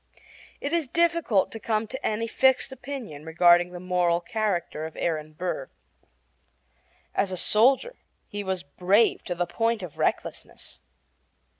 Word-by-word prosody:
It - - -3
is 335 -4 +1
difficult 335 - +2
to 225 - -7
come 215 0 -1
to 260 +5 -7
any 220 +1 0
fixed 265 +3 +2
opinion 245 - -7
regarding 175 +2 +4
the 180 0 -8
moral 180 -1 +1
character 190 -7 -2
of 160 - -13
Aaron 155 -2 -2
Burr. 180 - -4 1.4
As 195 -1 0
a 185 - -3
soldier 265 - +3 0.3
he 205 0 -5
was 190 -2 -3
brave 190 +9 +2
to 175 - -3
the 175 +1 0
point 225 +4 -1
of 170 -5 -9
recklessness. - - -3
200 Hz, 140 wpm, -26 LUFS, 175-235 Hz, 1.4 s, regarding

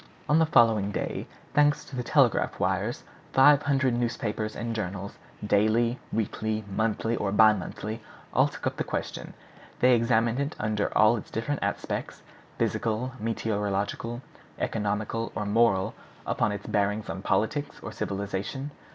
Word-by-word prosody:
On 150 +2 +4
the 160 - +4
following 115 -8 +4
day, 105 - -3 0.3
thanks 145 0 +3
to 135 - -9
the 125 - -1
telegraphic 120 - +2
wires, - - -1 0.3
five 145 +2 +7
hundred 140 -3 +2
newspapers 115 -2 -2
and 115 0 -3
journals, 100 -1 -4 0.3
daily, 110 +4 +2
weekly, 110 0 -1
monthly, 110 +3 0
or 100 -3 -1
bi 110 +1 +7
monthly, 105 +3 -5 0.3
all - - +5
took - - -8
up - - -1
the - - 0
question. - - -5 0.4
They 125 0 +5
examined 115 +1 +2
it 140 +1 -2
under 105 -1 0
all 110 +2 +6
its 105 - -8
different 130 +6 -2
aspects, - - -3 0.3
physical, 115 +3 -1
meteorological, 110 +2 -2 0.3
economical, 110 +2 -2
or 105 - -2
moral, 100 -2 +3 0.3
up - - -2
to - - +3
its 105 -1 -5
bearings 105 +1 0
on 95 - -5
politics 145 +10 -1
or - - -5
civilization. 100 +8 -4
110 Hz, 145 wpm, -27 LUFS, 105-120 Hz, 0.4 s, five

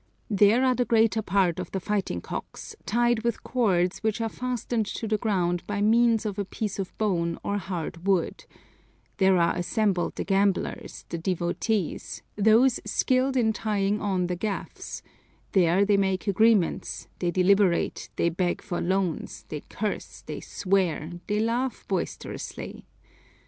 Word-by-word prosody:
There 210 +5 +5
are 255 - +4
the 250 - +1
greater 225 -1 +3
part 185 -3 +1
of 180 - -4
the 190 - -3
fighting 190 - -2
cocks - - -7
tied 240 0 +2
with 235 -1 -2
cords 185 -8 +1
which 220 0 -1
are 225 -1 -1
fastened 245 -2 -2
to 225 - -4
the 215 -1 +1
ground 180 -6 0
by 205 -1 -2
means 230 +1 +4
of 205 -1 -3
a - - +1
piece 200 +1 -4
of 190 - -5
bone 170 -6 0
or 205 0 -1
hard 175 -1 -5
wood; 190 -4 +1 0.7
there 190 -1 +4
are 170 -1 +3
assembled 185 0 0
the - - -2
gamblers, 195 -1 0
the 170 - -3
devotees, 180 +3 -2
those 225 +5 +4
skilled 260 +1 +1
in 220 -3 +3
tying 210 -1 0
on 190 -3 0
the 180 0 -2
gaffs, 200 +2 -5 0.5
there 185 +1 +4
they 205 0 +3
make 190 -1 0
agreements, 210 -2 +2
they 175 - 0
deliberate, 185 0 +2
they 170 - +2
beg 175 +1 -1
for 180 -4 -3
loans, 185 -2 -1
they 150 -2 -5
curse, 210 0 -5
they - - -5
swear, 180 -5 0 0.2
they 210 0 0
laugh 235 +3 -1
boisterously. - - -5
200 Hz, 150 wpm, -26 LUFS, 180-220 Hz, 0.7 s, There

